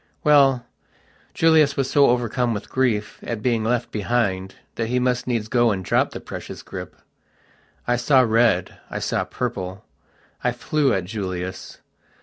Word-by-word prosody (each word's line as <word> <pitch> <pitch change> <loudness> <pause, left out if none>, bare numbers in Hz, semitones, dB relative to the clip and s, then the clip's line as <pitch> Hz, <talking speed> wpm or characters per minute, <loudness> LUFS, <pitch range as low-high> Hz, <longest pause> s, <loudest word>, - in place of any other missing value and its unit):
Well, 135 -4 +4 0.7
Julius 160 -3 +4
was 135 -1 +1
so 140 +1 +4
overcome 120 -1 0
with 100 - -7
grief 115 -5 0
at 115 -3 -5
being 115 -3 +1
left 120 +1 -1
behind 100 -4 -1 0.2
that 115 - -2
he 125 +2 0
must 125 0 0
needs 115 -4 -1
go 120 0 +3
and 95 -3 -2
drop - - +2
the - - -7
precious - - -8
grip. - - -8 0.9
I 120 0 +2
saw 130 +2 +4
red, 115 -5 +2
I - - -4
saw - - -1
purple. 95 +1 -5 0.6
I 125 - +1
flew 140 +2 0
at 95 -5 0
Julius. 95 -2 -5
120 Hz, 150 wpm, -22 LUFS, 105-125 Hz, 0.9 s, Well